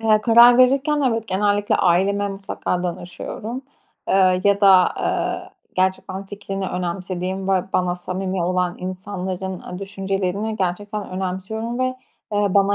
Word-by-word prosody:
Eee, 215 Hz, -1 st, +4 dB
karar 235 Hz, +2 st, +7 dB
verirken, 275 Hz, +4 st, +4 dB
evet, 225 Hz, -1 st, -3 dB
genellikle 205 Hz, +2 st, +1 dB
aileme 195 Hz, +3 st, +2 dB
mutlaka 195 Hz, -2 st, -3 dB
danışıyorum. 180 Hz, +7 st, -5 dB, 0.5 s
Eee, 185 Hz, -1 st, +4 dB
ya 200 Hz, 0 st, +3 dB
da, 200 Hz, -, +6 dB, 0.3 s
aaa, -, -, -2 dB, 0.3 s
gerçekten 190 Hz, +1 st, -1 dB
fikrini 195 Hz, -1 st, -5 dB
önemsediğim 185 Hz, +1 st, -3 dB
ve 190 Hz, -2 st, +2 dB
bana 180 Hz, -1 st, +1 dB
samimi 185 Hz, +1 st, -3 dB
olan 180 Hz, 0 st, 0 dB
insanların, 185 Hz, 0 st, -5 dB
ııı, 180 Hz, -, -7 dB
düşüncelerini 195 Hz, +2 st, -2 dB
gerçekten 205 Hz, +3 st, -3 dB
önemsiyorum 190 Hz, +6 st, -4 dB
ve, 255 Hz, -, +2 dB, 0.5 s
eee, 205 Hz, 0 st, +2 dB
bana 200 Hz, 0 st, +4 dB
195 Hz, 125 wpm, -21 LUFS, 185-205 Hz, 0.5 s, karar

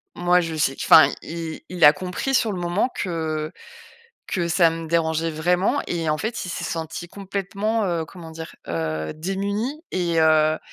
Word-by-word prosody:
moi, 175 Hz, +1 st, +3 dB
je 165 Hz, -1 st, -4 dB
sais 140 Hz, -3 st, +1 dB
q -, -, -5 dB
enfin, 155 Hz, -3 st, +9 dB
i 165 Hz, -1 st, -6 dB
il 180 Hz, -1 st, -2 dB
a 150 Hz, -, +10 dB
compris 185 Hz, -, -2 dB
sur 225 Hz, -3 st, +2 dB
le 185 Hz, -, -4 dB
moment 175 Hz, +7 st, +1 dB
que 160 Hz, -4 st, -2 dB, 0.8 s
que 175 Hz, -2 st, -1 dB
ça 170 Hz, 0 st, +4 dB
me 165 Hz, 0 st, -5 dB
dérangeait 165 Hz, 0 st, +1 dB
vraiment 180 Hz, -, +1 dB
et 165 Hz, -2 st, -2 dB
en 155 Hz, -, 0 dB
fait, 220 Hz, +5 st, -3 dB
il -, -, -6 dB
s'est -, -, -4 dB
senti 165 Hz, +1 st, -4 dB
complètement, 200 Hz, +3 st, -2 dB
heu, 170 Hz, -3 st, -1 dB
comment 170 Hz, -3 st, -11 dB
dire? 160 Hz, 0 st, -8 dB
Heu, 80 Hz, -2 st, -2 dB
démuni 200 Hz, -, -3 dB
et 170 Hz, -3 st, +1 dB
heu, 155 Hz, 0 st, +4 dB
170 Hz, 180 wpm, -23 LUFS, 160-190 Hz, 0.8 s, a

